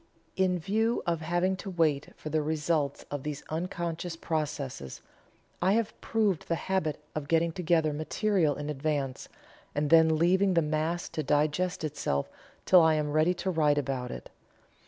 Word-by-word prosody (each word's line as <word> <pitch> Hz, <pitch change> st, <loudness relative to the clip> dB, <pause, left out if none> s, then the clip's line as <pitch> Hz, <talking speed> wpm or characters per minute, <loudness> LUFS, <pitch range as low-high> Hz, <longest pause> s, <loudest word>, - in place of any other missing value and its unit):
In 185 Hz, -1 st, +2 dB
view 220 Hz, +7 st, 0 dB
of 170 Hz, -2 st, 0 dB
having 175 Hz, +4 st, +1 dB
to 195 Hz, -, -6 dB
wait 160 Hz, -6 st, +1 dB
for 155 Hz, -, -7 dB
the 155 Hz, 0 st, +2 dB
results 150 Hz, -1 st, -1 dB
of 145 Hz, -1 st, -3 dB
these 150 Hz, 0 st, -5 dB
unconscious 170 Hz, 0 st, -3 dB
processes, 145 Hz, -, -4 dB, 0.6 s
I 185 Hz, +3 st, +3 dB
have 225 Hz, -1 st, 0 dB
proved 210 Hz, -7 st, 0 dB
the 170 Hz, -, +1 dB
habit 165 Hz, -4 st, -1 dB
of 150 Hz, -2 st, -4 dB
getting 165 Hz, +1 st, +2 dB
together 160 Hz, -3 st, +1 dB
material 155 Hz, +1 st, +1 dB
in 145 Hz, -, -5 dB
advance, 140 Hz, -2 st, -2 dB, 0.5 s
and 145 Hz, 0 st, 0 dB
then 160 Hz, -1 st, +6 dB
leaving 185 Hz, +3 st, +3 dB
the 165 Hz, -, +4 dB
mass 155 Hz, +3 st, -1 dB
to 155 Hz, -, -3 dB
digest 150 Hz, +6 st, 0 dB
itself 140 Hz, -, -2 dB, 0.3 s
till 180 Hz, -2 st, +7 dB
I 160 Hz, -1 st, +4 dB
am 150 Hz, -1 st, -1 dB
ready 155 Hz, +4 st, +3 dB
to 190 Hz, +2 st, -2 dB
write 150 Hz, -3 st, +2 dB
about 130 Hz, -3 st, -2 dB
it. -, -, -8 dB
160 Hz, 160 wpm, -29 LUFS, 150-180 Hz, 0.6 s, till